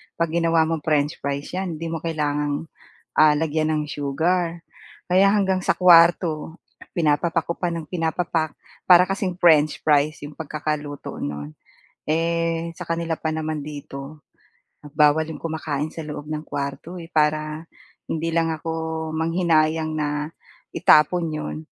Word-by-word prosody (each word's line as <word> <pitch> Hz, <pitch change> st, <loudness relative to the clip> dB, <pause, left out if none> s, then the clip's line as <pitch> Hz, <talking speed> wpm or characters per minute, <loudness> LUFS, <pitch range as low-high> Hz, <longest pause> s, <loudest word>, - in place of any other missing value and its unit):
'pag 165 Hz, -1 st, -1 dB
ginawa 165 Hz, -1 st, +3 dB
mong 160 Hz, 0 st, -1 dB
french 150 Hz, 0 st, +1 dB
fries 140 Hz, 0 st, -4 dB
'yan 185 Hz, -2 st, -3 dB
hindi 165 Hz, +1 st, -5 dB
mo 165 Hz, -, -3 dB
kailangang, 150 Hz, -2 st, -1 dB, 0.5 s
ah, 150 Hz, -1 st, +5 dB
lagyan 155 Hz, 0 st, 0 dB
ng 155 Hz, -1 st, 0 dB
sugar, 165 Hz, +4 st, -1 dB, 0.4 s
kaya 190 Hz, +2 st, +4 dB
hanggang 190 Hz, -3 st, +1 dB
sa -, -, +1 dB
kuwarto, 170 Hz, -2 st, +5 dB, 0.4 s
pinapapak 165 Hz, +1 st, +1 dB
ko 170 Hz, -, -2 dB
pa 175 Hz, -1 st, -2 dB
ng 165 Hz, -2 st, -5 dB
pinapapak, 165 Hz, -2 st, -1 dB, 0.3 s
para 180 Hz, 0 st, +7 dB
kasing 190 Hz, -2 st, -2 dB
french 155 Hz, -4 st, +4 dB
fries 150 Hz, +1 st, +3 dB
'yong 145 Hz, -, -11 dB
pagkakaluto 150 Hz, -2 st, -5 dB
no'n. 75 Hz, +1 st, -5 dB, 0.6 s
Eh, 165 Hz, +1 st, 0 dB
sa 180 Hz, -, -14 dB
kanila 165 Hz, 0 st, -1 dB
pa 160 Hz, -, -2 dB
naman 155 Hz, -1 st, -3 dB
dito 145 Hz, -1 st, -9 dB, 0.7 s
bawal 150 Hz, +1 st, +4 dB
'yong -, -, -8 dB
kumakain 155 Hz, -2 st, -3 dB
sa 165 Hz, -, -7 dB
loob 150 Hz, 0 st, -7 dB
ng 155 Hz, 0 st, -3 dB
kuwarto, 145 Hz, +5 st, -5 dB
eh, 165 Hz, -, -10 dB
para 155 Hz, 0 st, 0 dB, 0.4 s
hindi 165 Hz, +1 st, -2 dB
lang 165 Hz, 0 st, +1 dB
ako 160 Hz, 0 st, -4 dB
manghinayang 160 Hz, -1 st, +1 dB
na 150 Hz, 0 st, -2 dB, 0.5 s
itapon 165 Hz, +3 st, +4 dB
'yon, 155 Hz, -, -4 dB
160 Hz, 140 wpm, -23 LUFS, 150-165 Hz, 0.7 s, para